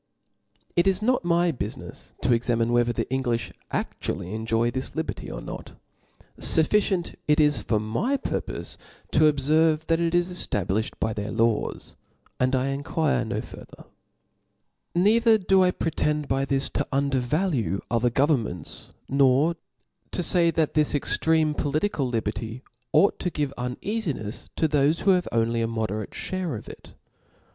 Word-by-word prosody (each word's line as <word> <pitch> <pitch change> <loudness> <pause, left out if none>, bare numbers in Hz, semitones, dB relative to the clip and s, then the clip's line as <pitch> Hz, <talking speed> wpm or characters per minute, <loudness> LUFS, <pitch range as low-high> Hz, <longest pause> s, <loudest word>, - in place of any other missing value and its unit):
It 175 +2 +3
is 195 +2 +2
opt 255 -1 +2
my 170 0 +2
bufinefs 110 -7 -7
to - - +4
examine 115 0 +1
whether 120 0 +3
the - - -2
Englifli 125 -3 -1 0.2
aftually 90 +4 -3
enjoy 115 +1 0
this 130 +2 -5
liberty, 160 0 -4
or - - -6
not. - - -8 0.7
Suf 160 - +4
ficient 195 -4 +1
it 150 +1 +3
is 150 -2 +3
for 110 - 0
my 145 - -1
purpofe - - -4 0.3
to 155 0 +5
obferve, 155 +3 +2
that 165 0 +1
it 170 0 +1
is 175 +1 +1
eftablilhed 105 - -1
by 110 - 0
their 105 0 -4
laws 115 0 0
j - - -21 0.4
and 130 +1 +2
I 130 +1 0
inquire 145 +3 0
no - - -3
far - - -11
ther; - - -15 1.1
Neither 220 +5 +5
do 190 -1 +3
I 180 - +4
pretend 150 -4 -1
by 135 0 0
this 135 -1 0
to - - -1
undervalue 135 - 0
other 120 +1 +2
gevernmcms, 120 - -1 0.2
nor 140 +4 +3 0.6
to 180 - -1
fay 170 -1 +3
that 160 -2 0
this 150 -1 +2
extreme 155 +2 +2
politi 155 +7 -1
cal 135 -4 -1
liberty 115 +1 -3 0.3
ought 200 - +4
to 180 - -1
give 145 -4 -2
uneafinefs 125 - -4
to 160 - +2
thofe 150 +2 +2
who 195 - +4
have 180 -1 +2
only 115 0 +1
a 115 - +1
moderate 110 -2 -3
(hare 185 -7 -3
of 105 - -8
it. - - -12
140 Hz, 155 wpm, -25 LUFS, 115-170 Hz, 1.1 s, to